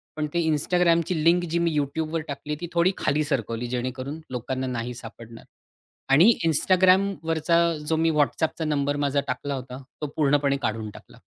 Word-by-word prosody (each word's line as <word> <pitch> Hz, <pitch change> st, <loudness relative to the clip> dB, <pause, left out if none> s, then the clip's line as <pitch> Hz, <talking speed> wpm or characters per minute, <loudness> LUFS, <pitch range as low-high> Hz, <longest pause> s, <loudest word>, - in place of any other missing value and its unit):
पण 155 Hz, -1 st, -2 dB
ते 170 Hz, -, +1 dB
Instagramची 170 Hz, +2 st, +2 dB
लिंक 175 Hz, +1 st, +4 dB
जी 170 Hz, -, +1 dB
मी 170 Hz, -1 st, +1 dB
YouTubeवर 155 Hz, +3 st, -2 dB
टाकली 150 Hz, +1 st, -5 dB
ती 175 Hz, -, -4 dB
थोडी 170 Hz, +2 st, +3 dB
खाली 150 Hz, +1 st, +1 dB
सरकवली 120 Hz, -4 st, -2 dB
जेणेकरून 130 Hz, +4 st, -4 dB
लोकांना 130 Hz, +1 st, -3 dB
नाही 120 Hz, 0 st, -3 dB
सापडणार 115 Hz, -1 st, -11 dB, 0.7 s
आणि 175 Hz, +12 st, +7 dB, 0.2 s
Instagramवरचा 175 Hz, -1 st, +2 dB, 0.3 s
जो 160 Hz, -, +1 dB
मी 165 Hz, +1 st, +2 dB
WhatsAppनंबर 145 Hz, -1 st, 0 dB
माझा 140 Hz, 0 st, +1 dB
टाकला 140 Hz, +3 st, -3 dB
होता, 130 Hz, 0 st, -8 dB, 0.2 s
तो 150 Hz, -, -2 dB
पूर्णपणे 140 Hz, -2 st, +2 dB
काढून 110 Hz, -1 st, -2 dB
टाकला. -, -, -15 dB
145 Hz, 150 wpm, -25 LUFS, 130-165 Hz, 0.7 s, आणि